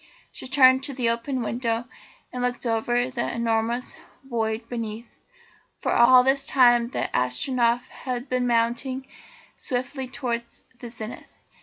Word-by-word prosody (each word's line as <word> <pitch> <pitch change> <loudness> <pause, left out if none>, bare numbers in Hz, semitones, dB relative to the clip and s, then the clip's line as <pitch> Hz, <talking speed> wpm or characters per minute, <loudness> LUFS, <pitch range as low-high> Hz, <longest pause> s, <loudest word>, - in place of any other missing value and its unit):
She - - -7
turned 260 -1 +6
to 280 - -4
the 240 -3 +1
open 240 +2 -2
window 230 0 -2 0.5
and 250 - -4
looked 245 0 -1
over 230 +1 0
into 250 +1 -1
the 235 - -1
enormous 230 +1 -1 0.3
void 225 -3 -2
beneath, 230 -1 -6 0.6
for - - -2
all 250 +1 +7
this 275 +1 +2
time 240 -3 +5
the 245 - -2
Astronef 235 - +1
had 250 0 -5
been 255 -1 0
mounting 240 +3 0 0.5
swiftly 255 +1 -3
towards 235 -2 -5 0.2
the 240 - -8
zenith. 225 -1 -8
245 Hz, 140 wpm, -25 LUFS, 230-255 Hz, 0.6 s, all